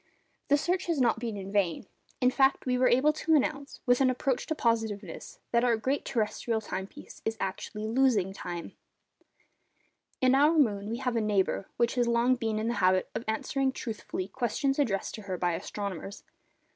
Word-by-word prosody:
The 290 - +4
search 360 +5 -1
has 335 -4 0
not 235 -3 +3
been 230 -3 -4
in 195 0 -6
vain. 195 -5 0 0.4
In 250 0 +4
fact, 270 +1 +3
we 250 -1 +1
are 255 0 +4
able 280 +5 +4
to 320 +1 +2
announce, 280 -1 -1
with 245 +1 +3
an 260 - +5
approach 255 0 -1
to 315 - -1
positiveness, 225 -5 -2
that 235 0 +3
our 240 -2 +3
great 265 +6 -1
terrestrial 225 -1 -1
time 190 -3 -5
piece 290 - -13
is 220 0 -2
actually 210 +2 -4
losing 220 -5 +2
time. 175 -3 -6 1.5
In 255 0 +4
our 295 +4 +5
moon 210 -8 +2
we 230 - -2
have 250 -1 -2
a 230 - +2
neighbour 200 -2 0
which 235 0 +2
has 245 -2 +1
long 235 +2 +3
been 225 -3 -2
in 215 +1 -1
the 235 - +1
habit 185 0 +3
of - - -3
answering 265 +5 0
truthfully 220 -7 -5
questions 265 +5 -1
addressed 205 -9 0
to 215 - -7
her 190 -3 -4
by 175 0 0
astronomers. 200 +2 -5
235 Hz, 185 wpm, -29 LUFS, 205-265 Hz, 1.5 s, an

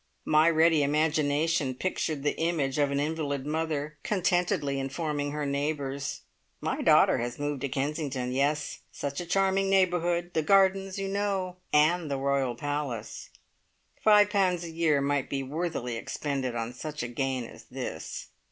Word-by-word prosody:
My 155 +2 +5
ready 160 -1 +4
imagination 150 -1 +1
pictured 155 -2 -2
the 145 - +1
image 155 -5 0
of 145 -1 +3
an 140 0 0
invalid 145 -2 -2
mother 155 -1 -2
contentedly 175 -7 0
informing 145 +1 -2
her 150 0 -3
neighbours: 140 -1 -2 0.4
"My - - -2
daughter - - +5
has 120 +1 -3
moved 145 -2 -3
to 140 - -2
Kensington. 135 -2 -2
Yes! 145 +3 0
Such 140 +3 -4
a 175 - -7
charming 195 +1 +2
neighbourhood. 175 -2 +2
The 160 - +2
gardens, 195 +2 +3
you 195 0 -2
know. 195 -2 -1
And 155 +2 +3
the 140 - -1
royal 135 -2 0
palace!" 145 -4 -4 0.7
Five 210 -1 +6
pounds 185 -4 +2
a 170 - -6
year 160 -3 +2
might 140 -1 0
be 135 -1 -2
worthily 140 -4 -3
expended 135 0 -3
on 115 +1 -3
such 150 +3 -5
a - - -2
gain 130 +1 -2
as 115 - -12
this! - - -6
150 Hz, 150 wpm, -28 LUFS, 140-170 Hz, 0.7 s, Five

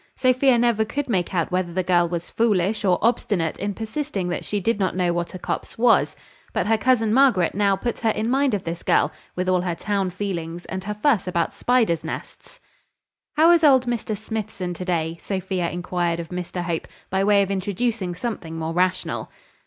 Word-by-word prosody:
Sophia 255 0 +3
never 235 -2 +3
could 275 +6 -3
make 185 -8 0
out 170 -2 -1
whether 180 -1 0
the 185 +2 -1
girl 175 -1 +3
was 170 0 -4
foolish 210 -2 +1
or 185 -3 +3
obstinate 205 -8 +1
in 205 +1 -1
persisting 220 -2 -3
that 175 - -3
she 205 - -2
did 210 +2 0
not 190 -2 0
know 180 -2 +1
what 175 +1 -3
a - - -3
copse - - -4
was: 230 0 +3 0.4
but - - 0
her 225 - +3
cousin 225 -1 +2
Margaret 245 -10 +4
now 200 0 +2
put 235 +5 -3
her 225 - +1
in 215 +1 -1
mind 265 -1 +2
of 195 - -4
this 170 +1 -4
girl, - - +2 0.2
with 180 0 -2
all 185 -1 +3
her 175 -2 -2
town 200 0 -1
feelings, 175 -3 -4
and 190 0 -5
her 210 +1 -3
fuss 210 -4 +2
about 170 -2 0
spiders' 230 -10 +1
nests. - - -8 0.8
"How 325 +3 +7
is 340 -2 +4
old 265 -4 +6
Mr 230 -3 -2
Smithson 215 -4 -4
to 180 +1 -6
day?" 165 -2 -1
Sophia 190 -3 -2
inquired 175 -1 -2
of 165 -1 -6
Mr 180 0 -4
Hope, 170 -2 -3 0.2
by 190 +1 +1
way 200 0 +4
of 195 - -3
introducing 195 0 -1
something 180 -6 -5
more 160 0 -3
rational. 185 +1 0
195 Hz, 200 wpm, -23 LUFS, 175-225 Hz, 0.8 s, How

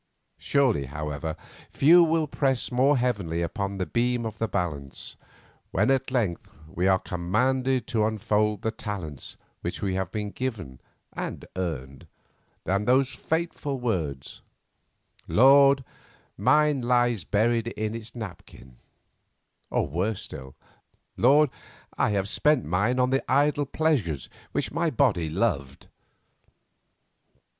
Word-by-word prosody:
Surely, 130 - +2
however, 75 +2 -4 0.3
few 170 +5 +6
will 165 -1 +2
press 135 -4 -1
more 135 +3 +3
heavily 100 -10 -1
upon 100 +3 -3
the 95 - -1
beam 120 +6 0
of 110 - -6
the 115 - 0
balance, 75 -9 -4 0.5
when - - +2
at 135 0 +1
length 115 -10 -1 0.2
we 90 +3 -1
are 95 -1 +5
commanded 125 +9 0
to 110 -2 +1
unfold 105 -1 0
the 110 - 0
talents 95 - -6 0.2
which - - -4
we 95 -2 0
have 95 -1 -2
been 105 -1 -3
given 100 - -5 0.3
and - - -5
earned, 70 -7 -5 0.6
than 100 +2 0
those 130 +2 +3
fateful 160 -4 -2
words: 80 - -3 0.9
"Lord, 135 +2 +6 0.5
mine 145 +5 +3
lies 120 -4 +2
buried 115 +5 +1
in 110 -2 -3
its 115 +1 -8
napkin," 85 - -10 0.9
or - - 0
worse 95 +8 -2
still: 65 0 -9 0.6
"Lord, 140 +3 +4 0.4
I - - +2
have 100 -2 0
spent 150 +4 +2
mine 100 +10 +1
on 125 0 +2
the 135 - +1
idle 145 +1 +2
pleasures 130 - 0 0.2
which - - -2
my 170 +2 0
body 105 - +1
loved." 75 - -2
110 Hz, 125 wpm, -26 LUFS, 90-130 Hz, 0.9 s, few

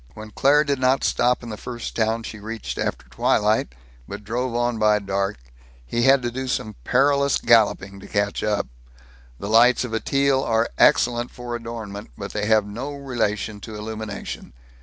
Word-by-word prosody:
When 110 0 -9
Claire 145 +6 +4
did 140 -2 -1
not 130 +1 +2
stop 125 0 +2
in 120 - -7
the 105 - -6
first 120 +1 -6
town 115 0 0
she 110 - -7
reached 110 +2 -6
after - - -3
twilight, 105 - +1 0.3
but - - -7
drove 120 +3 -2
on 120 -1 0
by 105 -1 +4
dark, 100 0 -2 0.5
he 120 - -1
had 135 +1 +5
to 120 - -1
do 130 +2 -4
some 110 -4 -2
perilous 140 +2 +3
galloping 105 -4 +3
to - - -11
catch 100 0 -1
up. 105 -1 0 0.7
The 100 - -6
lights 120 +4 +5
of 120 -3 -5
a 110 - +1
Teal 140 +1 +2
are 115 -2 +1
excellent 120 0 +4
for 120 -1 -6
adornment, 115 -3 -7
but - - -6
they 105 0 -1
have 110 -2 +4
no 120 +8 -5
relation 110 -6 -2
to 110 +1 -9
illumination. 105 - -6
115 Hz, 180 wpm, -23 LUFS, 105-125 Hz, 0.7 s, had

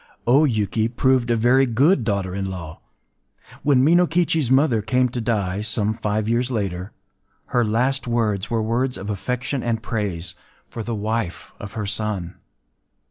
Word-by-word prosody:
” - - -41
O 150 +3 +6
Yuki 110 -3 0
proved 125 0 +1
a 120 - +3
very 125 +4 +4
good 135 +5 +3
daughter 100 -4 -1
in 95 0 -3
law. 85 -4 -8 0.8
When 135 -2 +3
Minokichi’s 165 -3 +3
mother 130 -4 +3
came 125 +4 +1
to 120 0 -4
die,—some 105 0 -1
five 110 -1 -2
years 120 +2 +1
later,—her 100 +3 -4
last 125 +5 0
words 110 -5 0
were 115 -2 0
words 125 +3 0
of 100 +3 -4
affection 125 +6 -3
and 115 -2 -2
praise 100 -6 -3 0.3
for 115 - -7
the 115 +1 -3
wife 110 -2 -3
of 100 0 -8
her 110 -2 -3
son. 100 -4 -2
115 Hz, 150 wpm, -22 LUFS, 105-125 Hz, 0.8 s, O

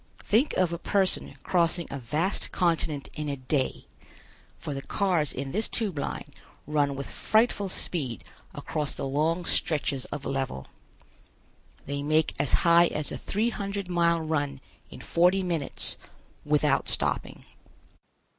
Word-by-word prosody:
Think 235 +8 +2
of 180 -2 +2
a 170 - -3
person 190 +1 0
crossing 170 -1 +2
a 140 - -4
vast 150 - -1
continent 165 -5 0
in 150 -1 -3
a 140 - -1
day, 130 +1 -1 0.7
for 145 - -5
the 135 - -4
cars 175 -4 +1
in 135 +1 -4
this 215 +7 0
Tube 200 -10 -1
Line 140 - -3 0.4
run 145 -1 +1
with 140 0 -4
frightful 215 -3 +1
speed 140 - -2 0.3
across 150 -3 -3
the - - -3
long 160 +5 +1
stretches 145 -6 0
of 145 -1 -6
level. 135 - -2 1.2
They 140 0 -3
make 155 +2 +2
as 140 - +2
high 170 0 +7
as 150 -2 -2
a - - -3
three 220 +4 0
hundred 200 -3 -4
mile 170 -1 +3
run 145 -3 -1 0.3
in - - -10
forty 180 +3 +3
minutes, 165 -6 0 0.5
without 150 -1 +2
stopping. - - -2
155 Hz, 140 wpm, -27 LUFS, 140-180 Hz, 1.2 s, high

